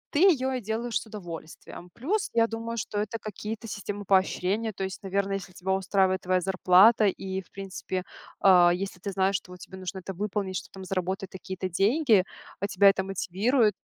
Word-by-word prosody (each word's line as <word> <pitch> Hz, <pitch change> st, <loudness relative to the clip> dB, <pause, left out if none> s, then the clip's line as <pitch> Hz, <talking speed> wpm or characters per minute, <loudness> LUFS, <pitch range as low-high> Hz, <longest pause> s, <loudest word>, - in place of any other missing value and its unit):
ты -, -, +3 dB
её 285 Hz, -9 st, +4 dB
и 250 Hz, -, -2 dB
делаешь 225 Hz, +2 st, -2 dB
с -, -, -12 dB
удовольствием. 175 Hz, -3 st, -9 dB
Плюс, 380 Hz, -, -1 dB
я 230 Hz, -1 st, +4 dB
думаю, 230 Hz, +1 st, -5 dB
что 205 Hz, -2 st, -3 dB
это 215 Hz, +2 st, -2 dB
какие-то 215 Hz, +2 st, -6 dB
системы 205 Hz, -1 st, -5 dB
поощрения. 195 Hz, +3 st, +1 dB
То 195 Hz, -, -5 dB
есть, 190 Hz, 0 st, -5 dB
наверное, 195 Hz, 0 st, -1 dB
если 185 Hz, -2 st, -10 dB
тебя 185 Hz, +2 st, -3 dB
устраивает 190 Hz, -1 st, +2 dB
твоя 185 Hz, 0 st, +1 dB
зарплата 190 Hz, +4 st, +5 dB
и, 190 Hz, 0 st, -3 dB
в -, -, -24 dB
принципе, 190 Hz, -1 st, -5 dB, 0.4 s
а, 180 Hz, -3 st, +6 dB
если 185 Hz, 0 st, -3 dB
ты 200 Hz, +2 st, -4 dB
знаешь, 195 Hz, +1 st, +1 dB
что 180 Hz, -, -13 dB
вот 180 Hz, -, -11 dB
тебе 190 Hz, -, -10 dB
нужно 185 Hz, +1 st, -5 dB
это 195 Hz, +2 st, -6 dB
выполнить, 195 Hz, 0 st, -3 dB
чтоб -, -, -8 dB
там 190 Hz, -1 st, -9 dB
заработать 190 Hz, +1 st, -3 dB
такие-то 190 Hz, 0 st, -5 dB
деньги, 210 Hz, -, +3 dB, 0.4 s
а 200 Hz, -, -1 dB
тебя 200 Hz, 0 st, +6 dB
это 190 Hz, -1 st, +1 dB
мотивирует 205 Hz, +5 st, +1 dB
195 Hz, 190 wpm, -27 LUFS, 185-215 Hz, 0.4 s, а